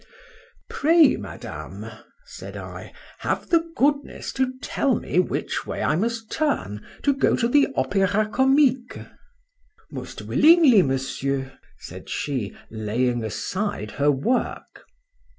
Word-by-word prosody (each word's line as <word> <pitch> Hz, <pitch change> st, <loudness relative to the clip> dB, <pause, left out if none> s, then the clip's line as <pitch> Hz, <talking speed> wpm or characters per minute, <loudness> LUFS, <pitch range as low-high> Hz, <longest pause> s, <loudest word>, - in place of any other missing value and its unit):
—Pray, 315 Hz, -1 st, +4 dB
Madame, -, -, -8 dB, 0.4 s
said -, -, -9 dB
I, -, -, -9 dB, 0.3 s
have -, -, -2 dB
the 335 Hz, -1 st, +3 dB
goodness 285 Hz, +1 st, 0 dB
to 260 Hz, -1 st, -1 dB
tell 265 Hz, -1 st, 0 dB
me 180 Hz, -, -1 dB
which 180 Hz, -, -2 dB
way -, -, -3 dB
I -, -, +2 dB
must 225 Hz, +4 st, -2 dB
turn 105 Hz, -, -1 dB, 0.2 s
to 285 Hz, -, +3 dB
go 275 Hz, -, +2 dB
to 235 Hz, -, +1 dB
the 285 Hz, +3 st, +4 dB
Opéra 205 Hz, +2 st, +1 dB
Comique?—Most 290 Hz, -, -2 dB
willingly, 310 Hz, -, +6 dB
Monsieur, 135 Hz, -1 st, -2 dB, 0.3 s
said -, -, -11 dB
she, 130 Hz, -9 st, -3 dB
laying 115 Hz, +2 st, -1 dB
aside 110 Hz, -, -3 dB
her 145 Hz, -, +4 dB
work. 145 Hz, -, -2 dB
230 Hz, 115 wpm, -24 LUFS, -, 0.4 s, willingly